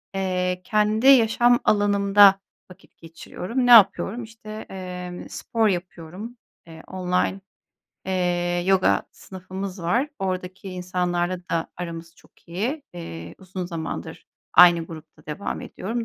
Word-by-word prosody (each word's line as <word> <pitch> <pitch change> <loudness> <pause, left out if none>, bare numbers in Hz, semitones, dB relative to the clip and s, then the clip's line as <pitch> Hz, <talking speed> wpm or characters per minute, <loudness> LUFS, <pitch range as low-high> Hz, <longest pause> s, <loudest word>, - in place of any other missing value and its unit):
eee, 180 -1 -1
kendi 215 +2 +1
yaşam 240 -1 +5
alanımda 200 -1 +5 0.3
vakit 180 - -19
geçiriyorum. 180 +8 -5
Ne - - +5
yapıyorum? 220 +1 +6
İşte, 220 -1 -10
eee, 180 -1 -7
spor 225 -2 -1
yapıyorum. 185 +5 -6 0.3
Eee, 160 -1 -12
online, 180 +1 -1 0.7
eee, 175 -1 0
yoga 190 -1 +3
sınıfımız 190 0 -8
var. 240 - +1
Oradaki 185 0 -4
insanlarla 180 0 -2
da 165 -1 -1
aramız 170 -1 -7
çok - - -25
iyi. 235 - -3
Eee, 85 - -8
uzun 185 -1 -6
zamandır 165 -3 -6 0.3
aynı 170 -2 +7
grupta 160 -2 -13
devam 150 +6 -5
ediyorum. 230 +3 -5
185 Hz, 115 wpm, -23 LUFS, 175-210 Hz, 0.7 s, aynı